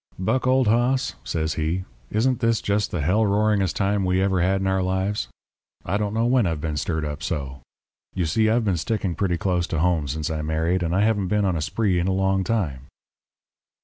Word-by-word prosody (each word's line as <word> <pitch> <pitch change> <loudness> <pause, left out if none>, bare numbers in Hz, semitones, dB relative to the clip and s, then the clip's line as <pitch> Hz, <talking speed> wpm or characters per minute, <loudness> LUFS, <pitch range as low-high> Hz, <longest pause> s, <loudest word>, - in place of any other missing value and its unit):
"'Buck 125 +8 0
old 130 0 +4
hoss,' 125 +4 +2
says 80 -1 -2
he, 80 +4 -1 0.3
'isn't 125 +3 +1
this 115 -1 +2
just 100 +1 0
the 85 - -3
hell 95 +9 +2
roaringest 105 -2 +1
time 100 0 +1
we 90 0 +1
ever 95 -2 +1
had 95 +2 +2
in 95 - -2
our 95 0 +1
lives? 95 - -1 0.6
I 95 +5 0
don't 105 0 -2
know 115 +1 +1
when 120 -4 +3
I've 80 -3 -2
been 75 0 -3
stirred 80 +1 -2
up 75 0 -5
so. 70 -2 -4 0.5
You 90 -3 0
see, 110 +7 +2
I've 115 +1 +2
been 95 -4 +1
sticking 95 +1 -1
pretty 90 -1 0
close 90 0 0
to 80 - -3
home 80 -2 +1
since 75 +4 -3
I 80 -1 -2
married, 80 +4 0
and 85 0 -1
I 100 - +3
haven't 105 -3 +1
been 105 +2 +1
on 95 -2 +1
a 80 - -2
spree 95 +2 0
in 85 - 0
a 95 - +1
long 95 0 +1
time.' 80 - -2
95 Hz, 215 wpm, -23 LUFS, 80-105 Hz, 0.6 s, old